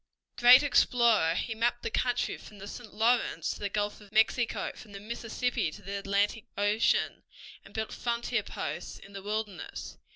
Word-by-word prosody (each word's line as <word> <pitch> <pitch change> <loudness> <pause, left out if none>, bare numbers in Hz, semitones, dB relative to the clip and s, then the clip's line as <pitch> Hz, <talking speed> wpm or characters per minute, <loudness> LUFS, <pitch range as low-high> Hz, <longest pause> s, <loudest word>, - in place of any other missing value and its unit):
Great 250 +3 +8
explorer, 235 - +4
he 225 - -2
mapped 240 +2 0
the - - -2
country 245 -1 0
from 210 - -13
the 200 +1 -9
St. 225 +1 -9
Lawrence 230 +3 +1
to - - -7
the 205 - -2
Gulf 205 +1 -2
of 205 -1 -16
Mexico, 225 +2 +2
from 210 - -13
the 200 - -7
Mississippi 235 -1 -2
to 205 +6 -12
the 200 +1 -4
Atlantic 200 +2 0
Ocean, 205 +2 +2 0.4
and - - -15
built 220 0 -4
frontier 235 -1 -1
posts 170 -3 -5
in 200 - -15
the 195 - -7
wilderness. 210 -2 -5
215 Hz, 170 wpm, -30 LUFS, 200-235 Hz, 0.4 s, Great